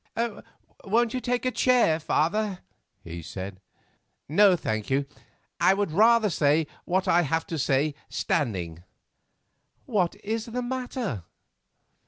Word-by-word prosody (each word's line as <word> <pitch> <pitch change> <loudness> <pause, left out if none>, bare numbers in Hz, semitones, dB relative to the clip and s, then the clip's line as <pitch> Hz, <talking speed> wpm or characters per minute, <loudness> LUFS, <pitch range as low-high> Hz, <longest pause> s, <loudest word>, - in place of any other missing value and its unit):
"Won't 230 +3 +1
you 255 - -1
take 245 0 -1
a 255 - +2
chair, 245 -12 +3
father?" 190 +5 0 0.4
he 85 0 -7
said. 95 +4 -7 0.7
"No, 190 +5 +5
thank 110 -10 -3
you; 135 +1 +1 0.5
I 190 - +5
would 200 -4 -1
rather 220 +3 +4
say 155 +1 +2 0.2
what 185 +2 0
I 175 -1 +5
have 160 +1 -1
to 165 - -4
say 140 +2 +1 0.2
standing." 90 - -2 1.0
"What 190 -7 0
is 220 +2 -2
the 250 +2 -3
matter?" 245 - -4
175 Hz, 125 wpm, -26 LUFS, 140-225 Hz, 1.0 s, No